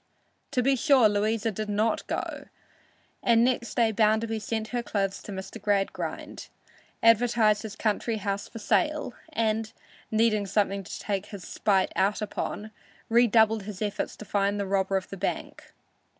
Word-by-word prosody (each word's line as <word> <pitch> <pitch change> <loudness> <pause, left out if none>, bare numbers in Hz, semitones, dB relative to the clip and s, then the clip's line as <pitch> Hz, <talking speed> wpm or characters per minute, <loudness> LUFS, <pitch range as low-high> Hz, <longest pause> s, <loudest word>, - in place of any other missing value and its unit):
To 250 - 0
be 275 +2 +3
sure 265 -3 +5
Louisa 215 +2 0
did 215 +1 -4
not 215 +2 0
go, - - -4 0.8
and 230 -1 +4
next 245 -1 0
day 230 -2 +3
Bounderby 220 +1 +2
sent 220 +1 -3
her 245 -1 -1
clothes 200 -3 -2
to - - -9
Mr. 190 0 -7
Gradgrind, 200 -2 -2 0.6
advertised 230 -2 +4
his 220 -2 -7
country 220 +1 -1
house 200 -1 -3
for - - -10
sale, 300 +5 0 0.2
and, 220 -1 0 0.4
needing 215 -2 +2
something 200 0 0
to - - -7
take 200 -1 -3
his 200 -4 -9
spite 190 +3 +1
out 200 +2 +2
upon, 215 0 -4 0.4
redoubled 225 -2 +4
his 205 -3 -7
efforts 210 -1 -2
to 215 - -10
find 200 +1 0
the 200 - -1
robber 195 0 +1
of 190 - -4
the 195 - -7
bank. - - -4
215 Hz, 155 wpm, -27 LUFS, 200-230 Hz, 0.8 s, sure